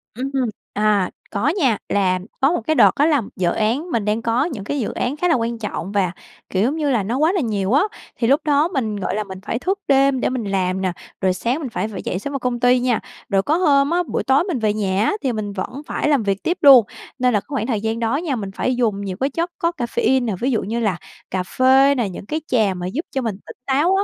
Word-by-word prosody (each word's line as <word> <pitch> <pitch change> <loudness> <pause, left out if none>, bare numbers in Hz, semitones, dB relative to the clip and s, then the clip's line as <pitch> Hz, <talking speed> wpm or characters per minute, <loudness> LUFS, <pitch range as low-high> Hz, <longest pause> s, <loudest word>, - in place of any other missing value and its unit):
Ừm. 265 +3 -4 0.4
À, 210 -3 +2 0.2
có 205 +6 0
nha, 245 - +3
là 185 -2 +2 0.2
có 275 +4 +4
một 350 - 0
cái 315 - +2
đợt - - +6
đó 295 - +5
là 295 -6 +3
dự 175 -2 +1
án 250 +11 -1
mình 225 -6 0
đang 215 +2 0
có 235 +5 +1
những 265 - -5
cái 285 +8 -2
dự 230 - -2
án 275 +5 -2
khá 355 - +1
là 330 - +4
quan 235 0 -1
trọng 205 -3 -4
và, 195 -4 +1 0.4
kiểu, 190 - 0
giống 265 +7 +1
như 300 -3 0
là, 230 -7 +1
nó 235 +6 -2
quá 315 +4 +3
là 375 - +1
nhiều 210 -3 -1
á. 290 - +5 0.3
Thì 230 - 0
lúc 280 +5 +4
đó 295 +1 +3
mình, 245 - -2
gọi 200 0 -2
là, 215 - -1
mình 190 -1 -9
phải 230 - -2
thức 385 +5 -1
đêm 275 -1 +4
để - - +1
mình 250 -3 -2
làm 190 -1 -1
nè, 185 - 0 0.3
rồi 185 -1 +2
sáng 240 - -1
mình 275 - -4
phải 215 -1 -2
phải 200 -4 -6
v - - -19
dậy 180 - -2
sớm 285 +8 -5
vào 275 - -2
công 245 -1 -2
ty 250 +1 +4
nha. 245 -2 +1 0.3
Rồi 195 -2 +2
có 310 +3 +1
hôm 285 -5 +3
á, 350 +1 +1
buổi - - -2
tối 270 +5 +3
mình 345 - -2
về 215 -1 +1
nhà 200 0 0
á - - +2
thì 260 - +1
mình 205 -2 -4
vẫn 250 +8 -5
phải 300 - -1
làm 275 -7 +3
việc 200 -1 -1
tiếp 345 - 0
luôn. 270 -6 +8 0.3
Nên 250 -1 +2
là 205 - +3
cái - - -17
khoảng 275 -2 -2
thời 220 -5 -1
gian 225 +1 -2
đó 230 +3 0
nha, 315 -5 -2
mình 200 -4 -5
phải 255 - 0
dùng 220 -5 0
nhiều 190 -2 -4
cái 270 - +1
chất 335 +5 -2
có 335 0 +1
caffeine 245 +1 +1
nè, 220 - -1
ví 260 +2 0
dụ 225 - +1
như 225 +4 -2
là 210 -6 0 0.3
cà 185 -1 -1
phê 265 +6 +4
nè, 230 -6 0
những 185 - -8
cái 310 +9 -3
trà 215 -6 +2
mà 180 0 -4
giúp 280 - -3
cho 265 - -1
mình 225 -5 -2
tỉnh - - -11
táo 295 +8 +2
á. 395 - +2
240 Hz, 280 wpm, -20 LUFS, 205-280 Hz, 0.4 s, luôn